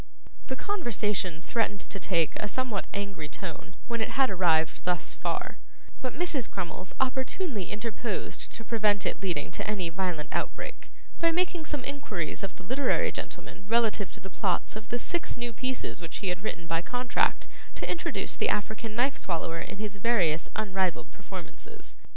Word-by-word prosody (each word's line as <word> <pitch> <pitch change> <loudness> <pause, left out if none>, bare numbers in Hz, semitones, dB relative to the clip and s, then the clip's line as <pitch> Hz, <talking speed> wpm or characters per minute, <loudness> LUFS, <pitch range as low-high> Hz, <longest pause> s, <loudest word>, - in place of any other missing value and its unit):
The 260 - -1
conversation 210 - 0
threatened 210 -2 +1
to 195 - -4
take 170 -4 +3
a 210 - -1
somewhat 235 -2 -1
angry 200 -7 -3
tone 170 -2 -6
when 235 -1 0
it - - +1
had 270 -1 +5
arrived 165 -4 +4
thus 180 -2 +1
far, - - -2 0.4
but 255 0 -2
Mrs. 305 - +1
Crummles 185 0 -3
opportunely 265 - +1
interposed 220 -1 -2
to 225 - -4
prevent 210 -3 +3
its - - 0
leading 175 -7 0
to - - -1
any 190 -5 +1
violent 175 -3 -1
outbreak, - - -2 0.3
by 335 0 +5
making 345 -2 +1
some 295 -4 -2
inquiries 260 - -2
of 195 -2 -3
the 185 - -11
literary 260 +8 +3
gentleman 195 - -6
relative 220 -4 +3
to - - -7
the 190 - -8
plots 185 +2 +1
of 215 0 -7
the 240 - +1
six 345 +8 -1
new 240 -1 -1
pieces 255 -5 -1
which 165 - -4
he 195 - 0
had 180 +1 -1
written 175 -5 -3
by 165 0 +1
contract 245 +5 +2 0.3
to - - -3
introduce 340 - -1
the - - +3
African 220 +1 0
Knife 260 +4 +3
swallower 165 -3 0
in - - -5
his 205 -1 -3
various 190 -8 +3
unrivalled 190 - +1
performances. - - -8
210 Hz, 170 wpm, -30 LUFS, 180-245 Hz, 0.4 s, had